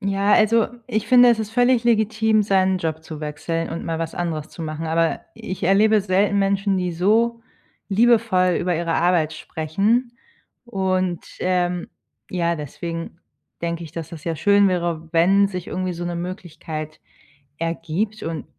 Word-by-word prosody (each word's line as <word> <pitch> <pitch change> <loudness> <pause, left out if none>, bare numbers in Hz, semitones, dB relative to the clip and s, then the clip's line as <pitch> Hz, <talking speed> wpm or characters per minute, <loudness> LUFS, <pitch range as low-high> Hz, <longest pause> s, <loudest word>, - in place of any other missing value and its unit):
Ja, 200 0 +2
also, 225 +1 +4 0.2
ich 215 -4 -2
finde, 245 -1 +7
es 230 - +2
ist 215 -1 -3
völlig 245 +1 +3
legitim, 220 -1 +2
seinen 190 -2 +2
Job 160 -2 -3
zu 160 -1 -8
wechseln 160 +2 -3
und 165 - -5
mal 165 -1 -2
was 165 - -4
anderes 165 -2 -3
zu - - -12
machen, 155 +1 -4
aber 165 +1 +1
ich 185 - -7
erlebe 210 +4 +4
selten 200 +1 +2
Menschen, 195 0 +1
die 180 -1 -1
so 225 +7 +2 0.5
liebevoll 210 -4 +3
über 180 -1 0
ihre 170 0 -1
Arbeit 165 -2 +2
sprechen 205 +13 -1 0.5
und, 185 -5 -1 0.2
ähm, 180 -1 0 0.4
ja, 170 -2 0
deswegen 165 +3 -6 0.4
denke 170 0 -3
ich, 155 - -11
dass, 165 -1 -6
das 160 -3 -10
ja 165 -2 -2
schön 200 +3 +4
wäre, 170 -3 -2
wenn 195 +4 +4
sich 180 -3 -6
irgendwie 185 -1 -3
so 175 +1 -5
'ne 175 - -3
Möglichkeit 160 -3 -6 0.6
ergibt 165 +6 -3
und 165 -1 -4
180 Hz, 160 wpm, -22 LUFS, 165-205 Hz, 0.6 s, finde